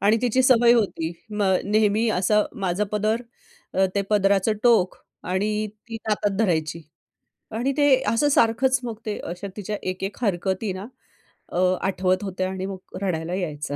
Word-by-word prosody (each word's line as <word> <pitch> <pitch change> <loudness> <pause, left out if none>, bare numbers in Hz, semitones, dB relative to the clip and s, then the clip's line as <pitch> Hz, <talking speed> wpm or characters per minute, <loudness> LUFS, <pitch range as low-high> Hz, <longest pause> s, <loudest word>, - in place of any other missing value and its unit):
आणि 210 +3 +4
तिची 250 +1 +2
सवय 240 -2 +6
होती. 190 -8 0 0.2
मग 200 -3 +2
नेहमी 215 +2 +2
असं 210 +3 +3 0.2
माझं 185 +3 +1
पदर 215 +3 0 0.5
अ, 190 - +3
ते 200 - +1
पदराचं 200 0 +3
टोक 225 -7 +4 0.3
आणि 210 +3 0 0.2
ती 225 - -5
हातात 205 -2 0
धरायची 165 -6 0 0.7
आणि 255 +4 0
ते 290 -2 +4 0.2
असं 230 +7 +3
सारखंच 260 0 +3
मग 235 -3 -5
ते 210 - -2
अशा 180 +3 -6
तिच्या 210 0 -4
एक-एक 185 +2 -4
हरकती 190 0 0
ना 190 +2 -7 0.6
अ, - - -5 0.2
आठवत 185 0 0
होत्या 185 -1 -2
आणि 190 0 -4
मग 190 -1 -8
रडायला 170 -3 -2
यायचा. 150 -6 -3
205 Hz, 155 wpm, -24 LUFS, 185-220 Hz, 0.7 s, सवय